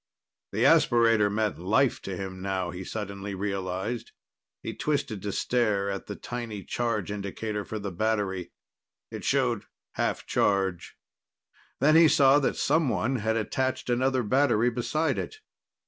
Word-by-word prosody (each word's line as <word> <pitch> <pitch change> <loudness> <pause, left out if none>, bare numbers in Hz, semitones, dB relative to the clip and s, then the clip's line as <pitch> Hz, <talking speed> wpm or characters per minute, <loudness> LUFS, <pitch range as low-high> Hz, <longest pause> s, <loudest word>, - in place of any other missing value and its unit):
The - - +1
aspirator 115 -3 +4
meant 105 -2 -1
life 110 +9 +2
to 95 -2 -5
him 95 -1 -6
now, 95 -2 -2
he 90 +2 -6
suddenly 100 -1 -5
realized. 100 +3 -3 0.5
He - - -4
twisted 140 -9 -2
to 100 - -3
stare 105 -4 +1
at 95 - -5
the 105 - -5
tiny 115 -5 -6
charge 115 -5 -2
indicator 105 +1 -4
for 110 - -5
the 100 -2 -4
battery. 100 -1 -1 0.6
It - - -6
showed - - +1 0.3
half - - -2
charge. 95 -4 0 0.8
Then 155 +4 +5
he 165 0 +8
saw 140 -1 +5
that 140 - 0
someone 135 -4 +1
had 110 0 0
attached 130 +3 -1
another 130 +1 +1
battery 120 0 +3
beside 140 +5 0
it. - - -5
110 Hz, 140 wpm, -27 LUFS, 100-125 Hz, 0.8 s, he